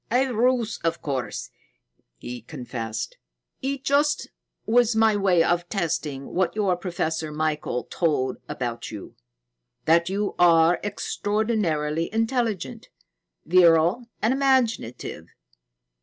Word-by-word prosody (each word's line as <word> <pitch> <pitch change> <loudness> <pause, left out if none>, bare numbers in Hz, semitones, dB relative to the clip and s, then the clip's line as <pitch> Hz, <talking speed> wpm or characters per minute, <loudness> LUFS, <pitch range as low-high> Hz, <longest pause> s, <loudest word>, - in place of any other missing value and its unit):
"A 260 +3 +3
ruse, 240 0 +1
of 165 0 0
course," 130 -7 -3 0.7
he 120 - -7
confessed. 115 -4 -5 0.4
"It 270 0 -3
just 290 +1 +1 0.3
was 235 0 +3
my 220 -1 +4
way 190 -4 +3
of 175 +1 0
testing 150 -7 -3
what 185 +2 +1
your 200 -4 +2
Professor 165 -3 -3
Michael 150 -5 -1
told 150 -6 0
about 120 -2 -4
you 105 -3 -9 0.7
that 170 +2 +4
you 200 +2 -1
are 170 0 +5
extraordinarily 205 -7 -1
intelligent, 225 -3 -1 0.6
virile, 175 +6 +4 0.2
and 225 +4 +3
imaginative. 260 - 0
175 Hz, 105 wpm, -25 LUFS, 155-225 Hz, 0.7 s, are